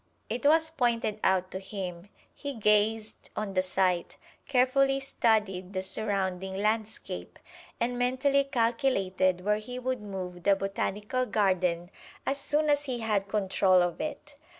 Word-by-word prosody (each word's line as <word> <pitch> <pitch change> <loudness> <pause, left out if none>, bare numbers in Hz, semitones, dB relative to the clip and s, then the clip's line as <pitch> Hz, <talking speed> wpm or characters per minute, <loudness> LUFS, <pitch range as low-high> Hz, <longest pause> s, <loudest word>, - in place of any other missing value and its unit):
It 245 +6 0
was 320 +1 +4
pointed 235 -7 0
out 185 -1 +2
to 190 - -4
him. 190 -2 -6 0.2
He 285 -2 -6
gazed 215 0 +1
on 210 -2 -3
the 185 - +3
site, 185 -1 0 0.3
carefully 270 +1 +3
studied 210 -8 0
the 185 0 -2
surrounding 190 -2 -2
landscape, 215 +2 -2 0.4
and 245 +1 -1
mentally 270 +3 +2
calculated 225 -8 +1
where 210 0 +2
he 250 +4 -7
would 255 -1 -2
move 185 -3 -6
the 200 +2 +4
Botanical 205 +5 -2
Garden 185 -4 +1 0.3
as 275 +1 0
soon 300 +2 +1
as 290 0 +2
he 250 -4 -3
had 210 -3 0
control 190 -3 +3
of 175 -1 -2
it. 300 -1 -5
210 Hz, 140 wpm, -29 LUFS, 190-250 Hz, 0.4 s, was